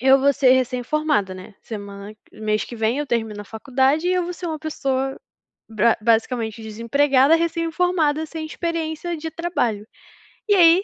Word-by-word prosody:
eu 265 +2 +6
vou 280 +1 +4
ser 260 -1 +4
recém-formada, 255 -3 0
né, 185 +3 -11
semana 200 -1 -8 0.2
mês 215 0 -1
que 240 - -9
vem 225 +4 0
eu 295 - -2
termino 225 -4 -2
a - - -15
faculdade, 265 - 0
e - - +2
eu 365 - +1
vou 355 - -4
ser 355 0 -7
uma 315 -2 -3
pessoa 270 -4 -2 0.5
bra 225 +1 +3
basicamente 225 0 0
desempregada, 265 +6 +3
recém-formada, 330 -1 0
sem 320 0 -6
experiência 335 +1 -3
de 320 +1 -5
trabalho. 250 - -2 0.6
E 410 - +6
aí 350 0 +6
270 Hz, 160 wpm, -22 LUFS, 225-320 Hz, 0.6 s, eu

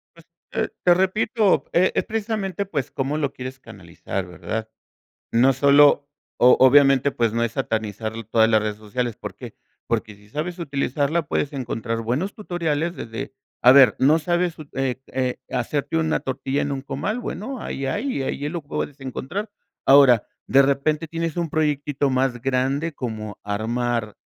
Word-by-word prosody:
Pues, 165 -1 -18 0.3
eh, - - -1
te 175 - +6
repito, 200 +3 +2
e-es 180 +2 +3
precisamente, 210 -4 -2
pues, 145 -10 -3
cómo 140 +3 -2
lo 140 -3 -1
quieres 130 +1 -7
canalizar, 95 -3 -6
¿verdad?, 110 +5 -5 0.6
no 125 +4 +5
solo, 140 +1 +5 0.3
o-obviamente, 135 +2 +6
pues, 115 -3 0
no 115 - +1
es 115 -1 -2
satanizar 110 -4 -2 0.2
todas 110 0 +4
las 110 -1 +4
redes 105 -1 -2
sociales, 115 +2 -3
¿por - - -8
qué?, - - -10 0.3
porque 105 - -2
si 105 +1 -21
sabes 160 - -4
utilizarla 145 +1 -1
puedes 145 - -1
encontrar 115 -3 -3
buenos 130 - -2
tutoriales 170 -5 -2
desde 115 +3 -6 0.3
a 125 - +8
ver, 130 -5 +7
¿no 150 +5 +4
sabes, 175 +1 0 0.2
eh, 130 -1 -2
eh, 130 -1 -2
hacerte 140 +6 -1
una 160 -1 +1
tortilla 135 +1 -2
en 145 - -2
un 135 -1 -3
comal?, 155 - -3
bueno, 245 +4 -5
ahí 135 - -4
hay, 205 - -2
ahí 145 +2 -3
lo 170 -1 -4
puedes 145 0 -5
encontrar, 155 - -5 0.4
ahora, 135 -5 +6 0.2
de 135 - +6
repente 150 +4 +1
tienes 165 0 -3
un 170 -2 -1
proyectito 145 -2 0
más 130 -2 0
grande 135 +5 0
como 110 -6 -6
armar 115 +1 -2
135 Hz, 155 wpm, -23 LUFS, 120-160 Hz, 0.6 s, a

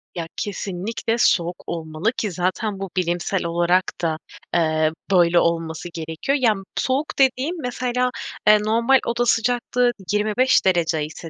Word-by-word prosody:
Ya, 170 -2 -4
kesinlikle 205 +3 -3
soğuk 175 -6 +1
olmalı 160 +5 -2
ki 210 - -1
zaten 185 +3 -2
bu 195 -1 -5
bilimsel 175 +1 -1
olarak 175 +2 +2 0.2
da, 160 -2 0 0.4
eee, 155 -2 +2 0.2
böyle 175 -2 +5
olması 165 0 -1
gerekiyor. 165 - -2
Yani, 215 -5 +2
soğuk 275 +3 -1
dediğim, 270 +5 +2
mesela, 250 0 -1 0.4
eee, 210 0 +7
normal 230 +5 +3
oda 235 +1 0
sıcaklığı 245 +1 +1 0.2
25 215 +5 +2
derece 165 -4 +2
ise 160 +2 -9
190 Hz, 135 wpm, -22 LUFS, 170-235 Hz, 0.4 s, eee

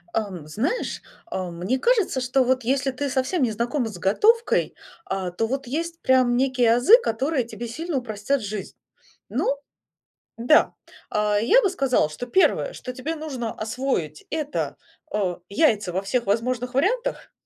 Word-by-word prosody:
Эм, 190 -8 -3
знаешь, 260 - -2 0.3
э, 185 -1 -3
мне 180 +10 -2
кажется, 430 - +2
что 250 +1 +2
вот 255 0 +1
если 270 +3 +1
ты 280 +2 -3
совсем 265 +6 0
не 240 -4 +2
знакома 240 +3 -1
с 190 - -9
готовкой, 430 - +2 0.3
а 190 -2 -3
то 225 +6 -1
вот 270 +3 -3
есть 330 +5 -3
прям 255 -2 +3
некие 250 -3 +3
азы, 280 - +7
которые 265 - 0
тебе 235 0 -7
сильно 315 +5 -3
упростят 245 +3 -1
жизнь. 205 -1 -6 0.5
Ну 280 - 0 0.8
да. 240 +7 +4 0.4
А, 210 0 +1
я 430 - +5
бы 395 - +2
сказала, 270 - +1
что 155 +10 -6
первое, 380 - +2
что 250 - -7
тебе 285 +6 -4
нужно 270 -8 -4
освоить, 220 - -3
это, 305 -2 -2 0.4
э, 190 -4 0
яйца 210 - +2
во 190 - 0
всех 235 +5 -1
возможных 245 +4 -1
вариантах. 470 - 0
250 Hz, 155 wpm, -24 LUFS, 215-285 Hz, 0.8 s, азы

